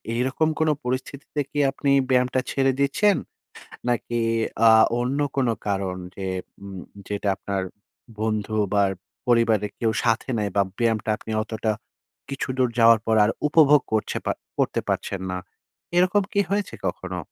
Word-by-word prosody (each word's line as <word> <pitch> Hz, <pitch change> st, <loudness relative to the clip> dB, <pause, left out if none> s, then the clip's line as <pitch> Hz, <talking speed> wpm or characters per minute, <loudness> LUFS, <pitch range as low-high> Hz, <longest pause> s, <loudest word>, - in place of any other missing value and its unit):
এরকম 130 Hz, +6 st, +1 dB
কোন 160 Hz, 0 st, +3 dB
পরিস্থিতিতে 130 Hz, +3 st, -4 dB
কি 145 Hz, -, -2 dB
আপনি 140 Hz, 0 st, -1 dB, 0.2 s
ব্যায়ামটা 125 Hz, 0 st, +2 dB
ছেড়ে 135 Hz, -1 st, +2 dB
দিচ্ছেন? 190 Hz, +9 st, +3 dB, 0.7 s
নাকি 120 Hz, 0 st, -1 dB, 0.5 s
আ -, -, +8 dB, 0.3 s
অন্য 130 Hz, +4 st, -1 dB, 0.2 s
কোন 130 Hz, -3 st, +2 dB, 0.2 s
কারণ 95 Hz, -2 st, -1 dB, 0.2 s
যে 95 Hz, -, -4 dB, 0.4 s
উম 100 Hz, -1 st, -8 dB, 0.3 s
যেটা 105 Hz, 0 st, -2 dB
আপনার 100 Hz, -1 st, -3 dB, 0.6 s
বন্ধু 110 Hz, -1 st, -1 dB, 0.2 s
বা 100 Hz, -, +4 dB, 0.4 s
পরিবারের 115 Hz, -4 st, +3 dB
কেউ 115 Hz, -, +1 dB
সাথে 115 Hz, +2 st, +1 dB
নাই। 105 Hz, -1 st, 0 dB
বা 100 Hz, -, +5 dB, 0.2 s
ব্যায়ামটা 110 Hz, -2 st, +1 dB
আপনি 110 Hz, -, -10 dB
অতটা 110 Hz, 0 st, -2 dB, 0.6 s
কিছুদূর 130 Hz, -2 st, -1 dB
যাওয়ার 115 Hz, 0 st, +7 dB
পর 110 Hz, -1 st, +3 dB
আর 105 Hz, -, +2 dB, 0.2 s
উপভোগ 150 Hz, -2 st, +6 dB
করছে 110 Hz, -1 st, 0 dB
পা -, -, +2 dB, 0.3 s
করতে -, -, +1 dB
পারছেন 95 Hz, -, -2 dB
না। 90 Hz, -, -2 dB, 0.6 s
এরকম 185 Hz, +3 st, +4 dB
কি 200 Hz, -, +2 dB
হয়েছে 205 Hz, 0 st, -1 dB
কখনো? -, -, -4 dB
120 Hz, 140 wpm, -24 LUFS, 110-140 Hz, 0.7 s, আ